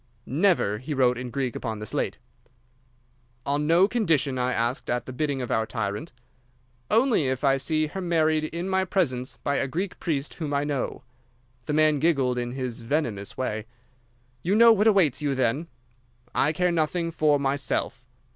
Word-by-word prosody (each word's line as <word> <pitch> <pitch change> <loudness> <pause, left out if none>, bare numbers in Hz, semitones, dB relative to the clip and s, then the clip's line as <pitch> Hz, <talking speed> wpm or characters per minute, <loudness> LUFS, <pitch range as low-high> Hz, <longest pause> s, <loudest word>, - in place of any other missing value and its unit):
"'Never!' 145 - +2
he 145 +5 -4
wrote 125 -2 +3
in 125 0 -5
Greek 130 -1 -2
upon 110 -3 -4
the 105 - -6
slate. - - -2 1.3
"'On 145 +1 0
no 170 +4 +5
condition?' 160 - +1
I 125 0 +1
asked, 120 +1 -1
at 120 0 -1
the 130 - -7
bidding 140 -1 -1
of 120 - -5
our 110 0 +1
tyrant. 110 +6 -4 0.8
"'Only 225 - +3
if 130 +1 -2
I 135 -1 +4
see 155 +3 0
her 190 +6 -5
married 160 -3 +1
in 170 +3 -4
my 190 0 +1
presence 135 -10 -1
by 140 -1 0
a 140 - 0
Greek 180 +7 -4
priest 150 -4 -2
whom 150 -4 -3
I 140 - +1
know.' 145 -4 -3 0.6
"The 150 - -1
man 155 -1 +3
giggled 135 -6 +2
in 120 0 -3
his 130 -3 -4
venomous 115 -6 -2
way. 110 -4 -3 0.7
"'You 185 +8 +1
know 230 +1 +8
what 210 +1 +2
awaits 190 - +3
you, 145 -2 0
then?' 130 +6 0 0.7
"'I 150 +3 +2
care 180 +2 +1
nothing 165 +1 0
for 150 -3 +2
myself. 140 -2 -1
145 Hz, 175 wpm, -26 LUFS, 125-165 Hz, 1.3 s, know